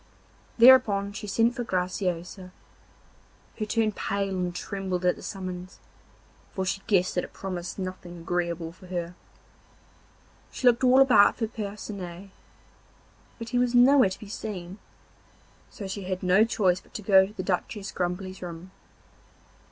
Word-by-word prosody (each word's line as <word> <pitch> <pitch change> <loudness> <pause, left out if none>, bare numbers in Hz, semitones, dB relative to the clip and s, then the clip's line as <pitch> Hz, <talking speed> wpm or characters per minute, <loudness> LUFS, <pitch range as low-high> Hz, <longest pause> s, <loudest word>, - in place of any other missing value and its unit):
Thereupon 230 -5 +6
she 210 +1 -7
sent 230 +4 +2
for 245 - -3
Graciosa, 180 -1 -3 1.1
who 215 - -3
turned 220 -2 0
pale 195 -1 -2
and 180 -1 -2
trembled 185 -1 -3
at 180 - +3
the - - -13
summons, 185 -1 -7 0.8
for 190 - -1
she 195 +1 -2
guessed 185 -3 +2
that 180 - 0
it - - -10
promised 180 -2 -6
nothing 185 -2 -6
agreeable 170 -1 -3
for 185 +2 -16
her. 175 -1 -4 1.4
She - - -5
looked 245 0 +4
all 255 +1 +6
about 225 -7 +5
for 225 - 0
Percinet, 200 -4 -7 1.1
but 230 -1 -7
he 245 0 +1
was 245 0 +1
nowhere 255 -2 +6
to 190 - -8
be 210 - -10
seen; 195 -3 -7 0.9
so 205 - -8
she 190 0 -5
had 185 0 -4
no 185 +4 +5
choice 190 -5 +1
but - - -26
to 210 - -5
go 190 -1 +5
to 205 - -14
the 190 -3 -5
Duchess 195 +2 -3
Grumbly's 185 +1 -4
room. 175 +1 -8
190 Hz, 150 wpm, -26 LUFS, 180-215 Hz, 1.4 s, Thereupon